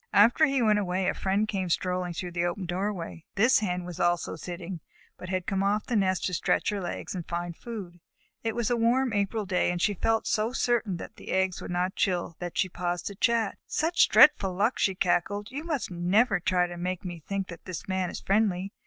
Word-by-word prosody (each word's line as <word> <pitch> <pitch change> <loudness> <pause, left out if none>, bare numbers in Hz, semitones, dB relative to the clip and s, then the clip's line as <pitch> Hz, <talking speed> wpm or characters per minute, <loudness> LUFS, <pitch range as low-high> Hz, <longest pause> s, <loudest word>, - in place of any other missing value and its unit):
After 235 +9 +6
he 275 -3 +1
went 210 -2 +4
away, 185 -1 -1
a - - +2
friend 200 +3 0
came 190 -4 -2
strolling 180 +1 -1
through 175 +1 -5
the 170 0 -1
open 180 +2 -2
doorway. 180 -2 -3
This 240 +6 +5
Hen 180 -4 -2
was 175 -1 -7
also 175 -1 +1
sitting, 175 +2 -6 0.4
but 180 - -9
had 185 -1 -1
come 195 -1 0
off 205 +2 +1
the 245 - -2
nest 190 -3 +1
to 180 - -2
stretch - - +1
her 205 -2 -2
legs 175 - -5
and 180 -3 -5
find 175 0 -3
food. 195 -7 -8 0.4
It 225 -1 -1
was 235 -1 0
a - - +3
warm 240 +2 +2
April 205 +1 0
day, 185 -2 +1
and 175 0 -1
she 205 +4 +2
felt 225 +4 0
so 220 +3 0
certain 235 -7 0
that - - -9
the - - -11
eggs 190 -1 0
would - - -7
not 180 +1 0
chill, 175 -3 0
that 175 -1 -5
she 190 - +2
paused 175 -1 -3
to 200 - -4
chat. 225 0 +1
"Such 330 +3 +2
dreadful 195 -11 +6
luck!" 210 +6 +1
she 190 - +2
cackled. 200 +3 0
"You 285 +4 -5
must 310 - -2
never 195 +4 +2
try 180 +1 +2
to 175 0 -7
make 180 +2 -3
me 175 -2 -5
think 195 +4 -4
that 170 - -10
this 180 -3 -6
Man 185 -1 -1
is - - -6
friendly. 195 -2 +1
190 Hz, 225 wpm, -28 LUFS, 175-215 Hz, 0.4 s, After